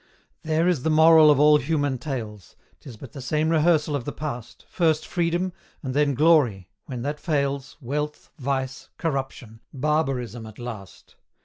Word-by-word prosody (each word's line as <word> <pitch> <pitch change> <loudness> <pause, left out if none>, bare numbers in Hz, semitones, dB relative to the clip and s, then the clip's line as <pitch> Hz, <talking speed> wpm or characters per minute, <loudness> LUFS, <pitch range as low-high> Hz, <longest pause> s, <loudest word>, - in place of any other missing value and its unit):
There 160 +2 +1
is 175 -7 +1
the 160 - 0
moral 160 0 +7
of 145 -2 +4
all 150 0 +6
human 145 -2 -1
tales: 110 - -6 0.2
'Tis 125 -6 -11
but 125 +1 -11
the 140 - -9
same 155 +5 0
rehearsal 155 -2 +2
of 140 - -3
the - - -4
past, 125 -6 -7
First 160 -3 +1
Freedom, 175 +1 -1 0.3
and 130 -2 -3
then 145 -1 +2
Glory 130 - +3 0.2
when 125 -3 -5
that 145 +2 -3
fails, 140 -4 -2
Wealth, 150 +4 -4
vice, 130 0 -3
corruption 135 -7 -4
barbarism 130 -6 -1
at 110 - -13
last. 110 -6 -9
145 Hz, 155 wpm, -24 LUFS, 125-155 Hz, 0.3 s, moral